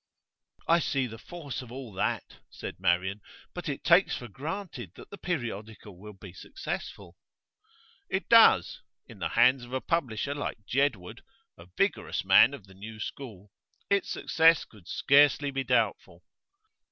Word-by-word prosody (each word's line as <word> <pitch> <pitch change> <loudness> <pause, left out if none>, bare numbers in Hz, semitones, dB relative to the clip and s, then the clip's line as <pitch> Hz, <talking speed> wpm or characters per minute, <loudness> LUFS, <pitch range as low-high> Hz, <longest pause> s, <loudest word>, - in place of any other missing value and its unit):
'I 170 +1 +5
see 135 -4 0
the 115 -2 -9
force 155 -5 -7
of 125 -2 -12
all 125 -4 -8
that,' 95 - -3
said - - -8
Marian; 95 +4 0 0.3
'but 175 -3 -5
it 140 - -5
takes 175 +3 +4
for 120 - -8
granted 140 - -6
that - - -14
the 200 - -8
periodical 110 - -5
will 105 +4 -11
be 90 -2 -11
successful.' 385 - -7 0.9
'It 190 - -2
does. 225 - +5 0.2
In - - -14
the - - -2
hands 130 0 +4
of 120 +1 -11
a 130 - 0
publisher 140 -5 -2
like 145 -7 -5
Jedwood 115 -5 -1 0.3
a 85 - -15
vigorous - - -1
man 140 - +6
of 105 - -14
the 95 - -17
new 110 +3 -10
school 105 -5 -8 0.4
its 200 0 +2
success 165 0 +3
could 100 -6 -19
scarcely 145 0 +3
be 135 0 -2
doubtful. - - -1
125 Hz, 155 wpm, -28 LUFS, 105-145 Hz, 0.9 s, man